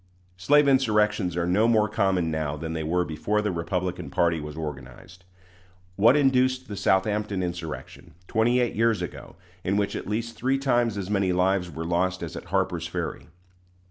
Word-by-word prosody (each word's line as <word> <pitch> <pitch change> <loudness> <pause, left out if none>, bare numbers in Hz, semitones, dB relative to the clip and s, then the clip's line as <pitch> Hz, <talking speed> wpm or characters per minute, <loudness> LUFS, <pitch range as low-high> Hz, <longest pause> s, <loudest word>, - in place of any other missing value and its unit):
Slave 145 +11 +4
insurrections 105 -8 +2
are 85 - 0
no 100 +6 +3
more 110 -2 +3
common 95 -6 0
now 75 -1 -2
than 80 +1 -5
they 80 - -3
were 90 +3 0
before 100 +7 -1
the 105 -1 0
Republican 90 +1 -3
party 85 -1 +1
was 75 0 -7
organized. 75 +4 -8 0.7
What 115 +7 +5
induced 130 -2 +2
the 105 - -6
Southampton 100 0 0
insurrection, 85 -4 -7
twenty 120 +3 +2
eight 120 -1 +1
years 110 -3 +2
ago, 85 - -8 0.3
in 100 +2 0
which 100 -1 0
at - - -5
least 115 +2 -3
three 130 +5 0
times 120 -5 +1
as 100 0 -4
many 100 -3 +1
lives 90 0 +1
were 80 -1 -6
lost 90 +2 0
as 80 - -6
at - - -7
Harper's - - -1
Ferry? - - -5
95 Hz, 175 wpm, -25 LUFS, 85-110 Hz, 0.7 s, What